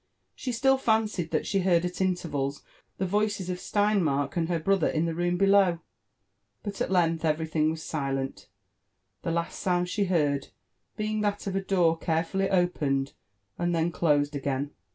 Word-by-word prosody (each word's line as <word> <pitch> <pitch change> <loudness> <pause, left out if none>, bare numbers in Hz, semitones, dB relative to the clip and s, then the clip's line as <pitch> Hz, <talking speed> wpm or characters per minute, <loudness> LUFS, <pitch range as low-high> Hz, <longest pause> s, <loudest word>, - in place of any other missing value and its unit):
She 255 - -4
still 265 +3 +3
fancied 220 -8 +1
that 155 - -1
she 195 - +1
heard 180 -2 +3
at 180 +1 -4
intervals 150 -7 -1 0.3
the 190 - -1
voices 205 -1 0
of 180 - -4
Sleinmark 185 -11 +1
and 165 -1 0
her 175 - +1
brother 195 +1 +2
in 155 +1 0
the 165 - -1
room 175 +1 0
below; 195 -2 +4 0.9
but 200 -2 -5
at - - 0
length 165 -3 +2
everything 155 0 +1
was 160 0 -4
silent, 135 -3 -3 0.8
(hft - - -1
last 170 0 -2
sound 180 -1 0
she 200 +1 0
heard 145 -6 +1 0.5
being 215 0 -1
that 205 -1 -1
of 195 -1 -3
a 195 - +1
door 175 -4 +2
carefully 170 +4 0
opened 145 -7 +1 0.5
and 175 0 +1
then 165 +1 +1
closed 150 -3 +1
again. 140 0 -2
175 Hz, 165 wpm, -27 LUFS, 155-195 Hz, 0.9 s, below